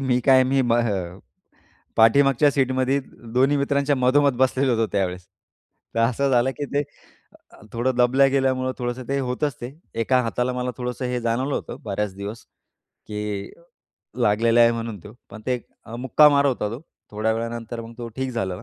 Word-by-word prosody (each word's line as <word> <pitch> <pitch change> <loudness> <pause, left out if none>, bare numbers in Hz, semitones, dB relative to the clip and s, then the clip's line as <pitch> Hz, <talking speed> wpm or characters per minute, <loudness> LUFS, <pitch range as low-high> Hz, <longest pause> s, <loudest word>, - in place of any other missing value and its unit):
मी 130 -2 +1
काय 130 -1 +6
मी 135 +1 +2
हं, 110 -8 0 0.8
पाठीमागच्या 135 +5 +5
सीटमध्ये 130 0 +1 0.3
दोन्ही 135 +3 +3
मित्रांच्या 140 0 +1
मधोमध 135 +2 +3
बसलेलो 130 0 +2
होतो 115 0 +1
त्यावेळेस 90 -2 -2 0.7
तर 115 - +1
असं 130 +4 +1
झालं, 130 0 +3
की 145 - -3
ते 145 - +2 0.7
अ, - - -18
थोडं 120 +2 0
दबल्या 125 +3 +4
गेल्यामुळं 130 -1 +1
थोडंसं 120 0 -4
ते 140 0 0
होतच 130 +2 -2
ते, 120 +2 -6 0.3
एका 125 +2 +2
हाताला 125 +1 -1
मला 125 0 -2
थोडंसं 125 +1 -4
हे 125 0 -1
जाणवलं 120 +4 -1
होतं - - -5
बऱ्याच 105 -2 -3
दिवस, 100 +3 -7 0.6
की 105 -1 -4 0.7
लागलेला 115 +2 +3
आहे 115 0 +6
म्हणून 115 -2 -5
तो. 105 - -10 0.2
पण 110 - -10
ते 125 -1 0 0.4
मुक्का 130 +4 +5
मार 140 -1 +3
होता 125 -6 0
तो, 115 +4 -6 0.3
थोड्या 110 +1 0
वेळानंतर 115 0 -4
मग 115 0 -9
तो 120 -1 -5
ठीक 130 0 -2
झालेला. 95 -7 -3
125 Hz, 165 wpm, -23 LUFS, 115-135 Hz, 0.8 s, काय